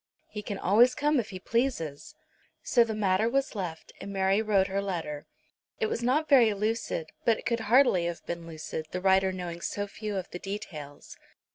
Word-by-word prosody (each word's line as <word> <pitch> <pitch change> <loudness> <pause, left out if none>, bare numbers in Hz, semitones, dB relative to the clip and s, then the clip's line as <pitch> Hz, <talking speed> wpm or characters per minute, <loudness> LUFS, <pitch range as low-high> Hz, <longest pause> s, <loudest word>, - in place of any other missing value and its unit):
He 210 - -6
can 205 -1 -5
always 230 +7 +4
come 295 -1 +2
if 225 - -3
he 190 - -6
pleases." 205 - -2 0.5
So 240 - +4
the 225 -2 -3
matter 205 +1 +2
was 275 +3 0
left, 180 -6 -5
and 200 - -6
Mary 195 +1 +2
wrote 205 -3 +3
her 195 +1 -1
letter. 165 -7 -4 0.5
It 450 - +1
was 435 - -2
not 275 +6 +1
very 245 -6 +6
lucid; 210 -6 -2
but 230 -2 +3
it - - -11
could 235 0 0
hardly 240 -8 +5
have 170 -1 -4
been 170 -1 -5
lucid, 155 -1 -6
the 180 - -3
writer 190 0 +3
knowing 175 -2 -6
so 205 +3 -2
few 210 +1 -5
of 185 - -5
the 180 - -6
details. 155 -8 -7
200 Hz, 190 wpm, -28 LUFS, 175-230 Hz, 0.5 s, very